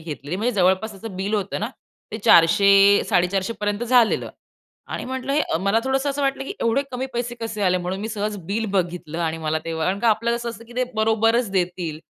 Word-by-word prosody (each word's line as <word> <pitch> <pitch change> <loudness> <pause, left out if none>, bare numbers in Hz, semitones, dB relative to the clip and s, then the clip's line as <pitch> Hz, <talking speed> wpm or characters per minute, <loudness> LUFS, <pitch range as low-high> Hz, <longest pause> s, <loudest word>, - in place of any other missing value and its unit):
घेतलेली, 155 +1 -6
म्हणजे 240 +4 0
जवळपास 190 +3 +2
त्याचं 195 -1 -9
बिल 200 +3 -2
होतं 200 -1 -2
ना, 215 - -2 0.4
ते 220 - -4
400-450 195 +1 +4
पर्यंत 205 +2 -1
झालेलं. 240 -2 +3 0.6
आणि - - -5
म्हटलं 260 +1 -3
हे 300 - +2
अ, - - 0
मला 200 +4 +2
थोडंसं 270 +2 0
असं 280 +1 -3
वाटलं 270 0 -1
की 290 - -5
"एवढे 230 +4 +2
कमी 255 +1 -3
पैसे 240 0 -3
कसे 220 -2 -4
आले?" 185 -1 +3
म्हणून 180 +2 -4
मी 220 - -4
सहज 210 -1 -3
बिल 220 +3 -1
बघितलं 175 -4 -2
आणि 160 0 -2
मला 155 0 -1
तेव्हा 160 -1 -2
कारण 190 +2 0
का 235 - +3
आपलं 230 +2 +2
कसं 235 0 -4
असतं 230 0 -11
की 235 - -15
ते 255 - +2
बरोबरच 225 +1 +2
देतील. 175 -4 -2
205 Hz, 210 wpm, -22 LUFS, 185-235 Hz, 0.6 s, 400-450